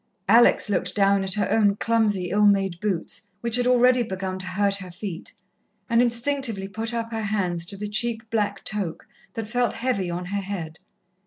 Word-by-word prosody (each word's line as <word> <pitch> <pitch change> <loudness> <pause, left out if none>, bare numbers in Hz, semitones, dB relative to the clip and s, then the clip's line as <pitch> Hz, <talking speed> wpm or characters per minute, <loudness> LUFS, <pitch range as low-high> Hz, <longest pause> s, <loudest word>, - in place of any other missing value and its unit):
Alex 230 +4 +5
looked 180 -2 -1
down 200 -1 +3
at 190 +1 0
her 205 -3 0
own 205 -3 +3
clumsy, 210 -5 0
ill 210 +1 +4
made 195 -3 +2
boots, 190 -5 -2 0.2
which 235 -1 +2
had 245 0 +2
already 250 0 +4
begun 190 -3 -4
to 185 - -1
hurt 200 +2 +1
her 185 -2 -9
feet, 180 -1 -7 0.6
and 230 +1 +3
instinctively 235 -4 +1
put 220 +3 -4
up 230 -1 -3
her 225 -1 -3
hands 180 -5 -1
to 200 - -4
the 210 +1 -4
cheap 225 +1 -2
black 205 -3 -1
toque, 200 -6 -4 0.3
that 225 -1 -4
felt 245 +2 0
heavy 215 -8 -1
on 175 +1 -4
her 200 +2 -3
head. 175 -5 -6
205 Hz, 185 wpm, -24 LUFS, 190-230 Hz, 0.6 s, Alex